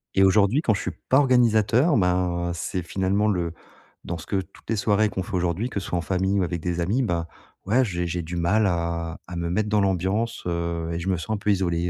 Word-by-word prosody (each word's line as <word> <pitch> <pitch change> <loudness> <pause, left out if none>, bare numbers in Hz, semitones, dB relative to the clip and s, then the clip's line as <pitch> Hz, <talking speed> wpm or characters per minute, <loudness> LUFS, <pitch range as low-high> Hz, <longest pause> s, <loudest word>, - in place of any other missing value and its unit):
Et 95 - +5
aujourd'hui 100 +8 +4
quand 110 -8 +2
je - - -3
suis - - -3 0.2
pas 130 - +5
organisateur 125 +1 +4
ben, 90 -2 +1
c'est 90 +1 -3
finalement 95 +4 0
le 85 -5 0 0.5
dans 85 - -4
ce 80 - -10
que - - -2
toutes 95 +3 -18
les 115 - +1
soirées 105 +1 +2
qu'on 95 - -3
fait 100 - -10
aujourd'hui, 90 +7 0
que 100 - -3
ce 90 - -7
soit 90 - -1
en - - 0
famille 95 +3 0
ou - - +2
avec 85 -1 -2
des 85 0 -2
amis 105 +10 +1
bah, 85 -7 -1 0.4
ouais 125 +7 +3
j'ai 90 -5 -2
j'ai 85 0 -2
du 85 +2 -6
mal 100 +5 +2
à 85 -1 -2
à 90 - -7
me 85 0 -2
mettre 105 +4 0
dans 105 -1 +3
l'ambiance, 95 +4 0
heu 85 -1 -2
et 85 - -2
je 95 +3 -3
me 90 - +1
sens 85 +6 -6
un - - -3
peu 105 - -2
isolé, 90 -3 0
95 Hz, 245 wpm, -24 LUFS, 85-105 Hz, 0.5 s, Et